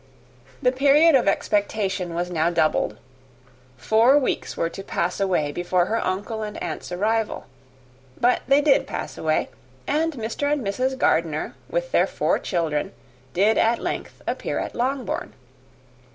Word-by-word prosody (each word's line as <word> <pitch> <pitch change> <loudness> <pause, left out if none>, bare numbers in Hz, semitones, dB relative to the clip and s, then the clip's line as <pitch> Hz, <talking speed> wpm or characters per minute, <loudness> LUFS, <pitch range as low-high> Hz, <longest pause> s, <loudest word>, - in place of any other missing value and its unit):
The 250 - +4
period 285 +5 +5
of 260 -6 +4
expectation 195 -3 0
was 175 +1 -2
now 165 -1 +1
doubled. 165 -2 +1 0.8
Four 225 - +4
weeks 280 - -1
were 165 - +1
to 180 - -7
pass 180 -1 -2
away 180 -7 +1
before 175 +2 +1
her 225 +4 -1
uncle 205 +4 -3
and 210 -1 -5
aunt's 165 +1 -5
arrival. 215 +4 -1 0.7
But 245 +1 +3
they 275 +2 +5
did 290 -2 +3
pass - - -5
away, - - 0 0.4
and 320 +3 0
Mr. 250 +4 -2
and 290 -6 0
Mrs. 255 +7 -1
Gardiner, 160 -9 +1 0.2
with - - -2
their - - +3
four - - 0
children, 165 0 -2 0.4
did 205 +5 +3
at 230 +1 +3
length - - -5
appear - - -2
at - - -3
Longbourn. 255 -2 -2
215 Hz, 145 wpm, -23 LUFS, 175-260 Hz, 0.8 s, period